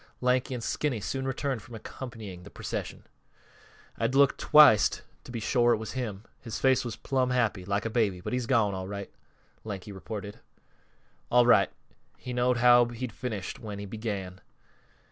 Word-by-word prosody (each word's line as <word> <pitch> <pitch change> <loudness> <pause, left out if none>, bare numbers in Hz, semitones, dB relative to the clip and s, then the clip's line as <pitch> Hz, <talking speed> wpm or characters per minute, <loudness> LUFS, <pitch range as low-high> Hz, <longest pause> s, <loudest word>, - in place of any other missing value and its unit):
Lanky 125 +1 +1
and 120 - -5
Skinny 140 -4 -1
soon 130 +6 -3
returned 135 -2 -2
from 115 - -11
accompanying 110 -5 -8
the - - -12
procession. - - -5 1.0
"I - - +1
had - - 0
to - - +2
look 140 -1 +5
twict 150 -8 +6 0.2
to - - -9
be 120 - -4
shore 120 +2 +3
it - - +1
was 110 0 -6
him. 110 -6 -4 0.2
His 115 -3 -6
face 130 -1 +3
was 120 -3 -5
plumb 130 -2 0
happy, 115 -7 0
like 100 +3 -1
a - - 0
baby. 105 -6 +1
But 90 - -5
he's 125 -2 -1
gone, 115 -6 +2
all 95 0 -4
right," 100 0 -6 0.5
Lanky 105 -1 -6
reported. 100 +1 -7 0.9
"All 125 0 +5
right 120 - +5 0.5
he 125 - -6
knowed 125 0 +2
how 120 0 +6
he'd 120 0 -6
finish 110 -6 -5
when 105 -2 -7
he 100 - -6
began. 100 -3 -5
115 Hz, 180 wpm, -28 LUFS, 100-125 Hz, 1.0 s, twict